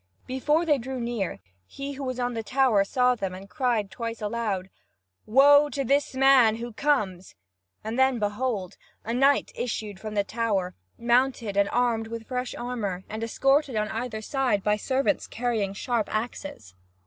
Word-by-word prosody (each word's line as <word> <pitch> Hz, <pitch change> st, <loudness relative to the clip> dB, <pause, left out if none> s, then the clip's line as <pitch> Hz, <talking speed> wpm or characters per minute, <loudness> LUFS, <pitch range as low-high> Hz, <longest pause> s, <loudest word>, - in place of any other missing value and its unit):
Before 295 Hz, +6 st, +1 dB
they 295 Hz, -4 st, +3 dB
drew 260 Hz, +2 st, -5 dB
near, 235 Hz, -6 st, -2 dB, 0.3 s
he 275 Hz, 0 st, -6 dB
who 275 Hz, 0 st, -7 dB
was 255 Hz, -1 st, -3 dB
on 245 Hz, 0 st, -1 dB
the 225 Hz, -, -2 dB
tower 250 Hz, -3 st, +3 dB
saw 250 Hz, +5 st, +2 dB
them 195 Hz, -6 st, -4 dB
and 190 Hz, +1 st, -10 dB
cried 235 Hz, -7 st, -1 dB
twice 230 Hz, +1 st, -5 dB
aloud: 210 Hz, -4 st, -2 dB, 0.6 s
"Woe 285 Hz, +5 st, +6 dB
to 280 Hz, -1 st, -2 dB
this 275 Hz, +1 st, +1 dB
man 260 Hz, -4 st, +6 dB
who 235 Hz, 0 st, -6 dB
comes!" 210 Hz, -, -1 dB, 0.5 s
And 220 Hz, +4 st, -3 dB
then 265 Hz, -1 st, +4 dB
behold! 205 Hz, -2 st, -2 dB, 0.3 s
A 230 Hz, -, -2 dB
knight 275 Hz, +3 st, +3 dB
issued 215 Hz, -5 st, -4 dB
from 215 Hz, 0 st, -6 dB
the 205 Hz, -, +2 dB
tower, 200 Hz, -4 st, -1 dB, 0.2 s
mounted 240 Hz, -3 st, +1 dB
and 200 Hz, 0 st, +3 dB
armed 230 Hz, -2 st, +1 dB
with 230 Hz, 0 st, -6 dB
fresh 250 Hz, 0 st, -3 dB
armour, 215 Hz, -7 st, -4 dB
and 220 Hz, +1 st, -4 dB
escorted 270 Hz, +3 st, +2 dB
on 215 Hz, 0 st, 0 dB
either 225 Hz, -1 st, -4 dB
side 250 Hz, -6 st, 0 dB
by 210 Hz, 0 st, +3 dB
servants 265 Hz, +6 st, 0 dB
carrying 225 Hz, -4 st, -1 dB
sharp 225 Hz, +2 st, -2 dB
axes. 225 Hz, -, -5 dB
235 Hz, 165 wpm, -26 LUFS, 210-260 Hz, 0.6 s, Woe